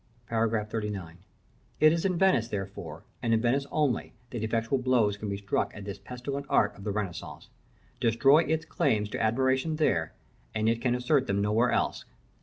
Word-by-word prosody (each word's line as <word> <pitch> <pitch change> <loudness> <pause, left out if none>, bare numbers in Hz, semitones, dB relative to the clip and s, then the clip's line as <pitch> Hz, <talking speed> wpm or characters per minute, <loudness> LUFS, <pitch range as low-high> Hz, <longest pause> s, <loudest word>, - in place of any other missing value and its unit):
§ 115 0 +2
XXXIX. 105 -5 -3 0.6
It 155 +1 +6
is 170 +2 -1
in 185 -2 +1
Venice, 175 -12 +3
therefore, 95 -7 -6 0.2
and 115 -2 +2
in - - +2
Venice 130 +4 +1
only 150 -5 0 0.2
that 120 - -4
effectual 115 +4 0
blows 125 -5 +2
can 105 0 -5
be 100 - -2
struck 100 0 -1
at 100 - -8
this 100 -1 -6
pestilent 135 +3 -6
art 105 -1 +3
of 100 - -12
the 105 - -2
Renaissance. 100 -4 -5 0.5
Destroy 135 +6 +5
its 160 0 0
claims 105 -8 0
to - - -3
admiration 130 +7 +1
there, 85 - +1 0.4
and 110 0 +1
it 115 0 +1
can 125 -1 +1
assert 130 +2 +1
them 100 0 0
nowhere 105 +4 +2
else. - - 0
115 Hz, 180 wpm, -28 LUFS, 105-135 Hz, 0.6 s, It